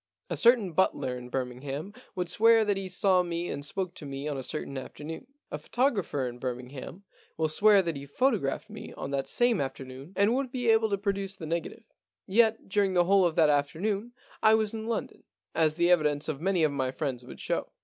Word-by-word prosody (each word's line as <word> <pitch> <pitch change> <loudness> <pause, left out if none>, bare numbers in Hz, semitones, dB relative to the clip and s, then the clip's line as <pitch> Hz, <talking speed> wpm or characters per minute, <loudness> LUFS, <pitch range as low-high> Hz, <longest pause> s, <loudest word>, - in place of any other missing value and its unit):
A - - 0
certain 230 -7 +4
butler 150 -8 +1
in 125 0 -8
Birming 125 -1 -3
ham 145 +8 -5 0.2
would 180 -1 -2
swear 225 +4 +5
that 205 -1 +1
he 195 -1 -4
saw 185 0 +3
me 175 0 -3
and 140 - -4
spoke 185 +4 -3
to 155 - -9
me 140 +1 -5
on 150 - -2
a 135 - -3
certain 140 +1 -5
afternoon. 150 - -7 0.2
A 150 - -4
photographer 195 - 0
in 120 0 -7
Birmingham 130 +8 -6 0.3
would 160 -1 0
swear 205 +3 +5
that 165 -3 -2
he 140 0 -7
photo 250 - +2
graphed 135 -3 -3
me - - -9
on 135 - -6
that 135 -1 -1
same 240 -6 +2
afternoon, 135 +3 -7
and 205 +3 +3
would 260 -1 -1
be 245 -3 +2
able 220 0 +3
to 200 - 0
produce 195 -1 -2
the 170 - -8
negative. 170 +8 -4 0.4
Yet 225 +2 +2
during 195 -1 +1
the 175 - +5
whole 190 +1 +4
of 165 -2 0
that 155 -3 +5
afternoon 195 +11 -1 0.3
I 215 0 +6
was 220 0 0
in 220 0 -5
London, 230 -1 -3 0.3
as 155 -1 +2
the 175 +1 +3
evidence 150 -4 +2
of 155 -2 -3
many 185 -2 +2
of 155 - +3
my 135 -2 -1
friends 130 -2 -3
would 125 - -11
show. - - -2
175 Hz, 215 wpm, -28 LUFS, 140-205 Hz, 0.4 s, I